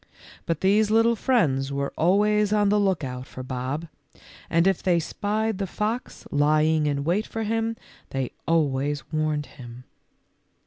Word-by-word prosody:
But 165 -2 -1
these 205 +3 +3
little 225 +2 +4
friends 140 - +1
were 140 0 -2
always 210 +4 +3
on 210 -1 +3
the 210 +1 +3
lookout 140 -10 -1
for 130 - -8
Bob, 130 +5 -4 0.6
and 165 +1 +3
if 195 -2 +2
they 175 -2 +2
spied 210 +4 -2
the 195 - -1
fox 220 +6 -3
lying 155 +1 +3
in 140 -1 -1
wait 180 +8 0
for 225 - -4
him 225 +1 -1 0.3
they 135 -2 -3 0.2
always 145 -3 +1
warned 155 -1 0
him. 120 -2 -12
165 Hz, 145 wpm, -25 LUFS, 140-210 Hz, 0.6 s, little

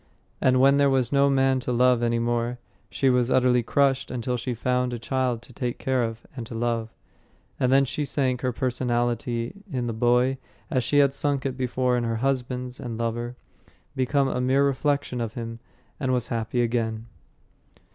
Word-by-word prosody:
And 130 0 +4
when 135 +2 +5
there 140 -1 +4
was 130 -3 +1
no 140 0 +4
man 135 -1 +3
to 125 - -3
love 125 0 +3
any 120 0 +1
more, 120 +1 -1 0.3
she 135 - 0
was 125 -1 +3
utterly 125 -1 +3
crushed 135 +2 +1
until 125 0 -2
she 120 +1 -3
found 125 +1 0
a - - -2
child 125 -1 -1
to 125 - -16
take 120 0 -3
care 130 -2 0
of 115 0 -5
and 125 - -5
to 115 - -8
love; 115 -1 -1 0.7
and 125 - +2
then 135 +1 +5
she 150 +3 -3
sank 130 -3 0
her 130 - 0
personality 120 - -1
in 125 -2 -2
the 115 - -2
boy 125 +3 +2 0.3
as 130 -5 +1
she 145 +4 +1
had 140 -1 +5
sunk 140 -1 -1
it 130 -2 -1
before 125 -1 0
in 120 - -1
her 115 -1 -1
husbands 125 0 -2
and 115 -3 -5
lover, 120 +1 -3 0.6
became 135 +1 +1
a 125 - -1
mere 135 +2 +3
reflection 140 -2 0
of 115 -2 -4
him, 115 -1 -6 0.4
and 130 -2 0
was 125 -2 0
happy 115 +1 -1
again. 115 -1 -1
125 Hz, 185 wpm, -25 LUFS, 120-130 Hz, 0.7 s, when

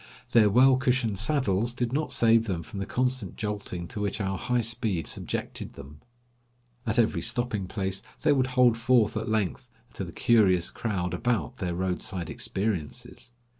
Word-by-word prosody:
Their 110 -3 +6
well 130 +5 +6
cushioned 125 -6 0
saddles 120 -3 +1
did 120 -1 -2
not 155 +2 -1
save 115 0 +4
them 85 -4 -2
from 100 - -8
the 100 - -3
constant 125 -6 -1
jolting 100 -5 -4
to 105 - -5
which 100 +1 -2
our 95 -1 -1
high 125 +5 0
speed 110 -6 -1
subjected - - -4
them. 70 +2 -12 0.9
At 110 +2 0
every 115 -2 +2
stopping 120 -6 -1
place 95 -1 -2 0.2
they 150 -1 +5
would 130 -2 +2
hold 120 -2 +5
forth 115 -3 +3
at 110 +1 -2
length 110 +4 -1 0.2
to - - -5
the 85 - -7
curious 100 -7 +3
crowd 90 -6 -2
about 115 -11 -1
their 90 -2 -2
roadside 90 -1 -2
experiences. 100 +3 -4
110 Hz, 165 wpm, -27 LUFS, 95-120 Hz, 0.9 s, Their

